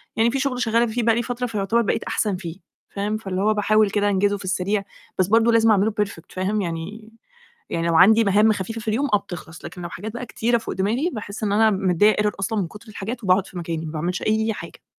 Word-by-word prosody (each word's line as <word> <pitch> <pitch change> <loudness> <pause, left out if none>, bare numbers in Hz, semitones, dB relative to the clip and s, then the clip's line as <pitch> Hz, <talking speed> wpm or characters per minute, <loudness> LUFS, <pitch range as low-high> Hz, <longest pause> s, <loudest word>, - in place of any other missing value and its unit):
يعني 225 +1 +3
في 270 - -1
شغل 260 -2 -1
شغّالة 230 0 +2
فيه 235 +1 -2
بقى 225 0 +3
لي 235 - 0
فترة، 245 +1 -3
فيعتبر 220 +1 0
بقيت 220 - -1
أحسن 210 -3 -1
فيه، 170 -3 -7 0.4
فاهم؟ 205 +2 -2
فاللي 195 -3 -3
هو 215 +2 +3
باحاول 215 0 +3
كده 205 +1 +1
أنجزه 205 +1 +1
في 200 - -10
السريع، 195 +2 0 0.4
بس 185 - +3
برضه 225 +3 +4
لازم 225 -1 +4
أعمله 210 +1 +3
perfect 195 -5 -4
فاهم؟ 195 +3 -1
يعني 195 +6 -6 0.6
يعني 165 0 -1
لو 165 - +2
عندي 220 +6 +6
مهام 210 +2 +4
خفيفة 215 +3 -4
في 225 - -8
اليوم، 255 +7 +1
آه، - - +6
بتخلص، 175 -3 -10
لكن 180 - -8
لو 170 - -4
حاجات 210 +5 -7
بقى 240 +2 -6
كتيرة 235 +1 0
فوق 225 - -6
دماغي، 230 - 0
باحس 215 -1 -7
إن 200 - 0
أنا 220 +1 +4
مدّيّة 195 +1 +3
error 210 0 +1
أصلًا 205 +2 -1
من 180 - -1
كُتر 210 +5 -14
الحاجات، 215 +3 -6
وباقعد 185 +1 +3
في 180 - -9
مكاني، 165 -1 -4
ما 155 - -6
باعملش 170 +4 -2
أي 220 +1 +1
حاجة. - - -10
210 Hz, 235 wpm, -22 LUFS, 190-225 Hz, 0.6 s, عندي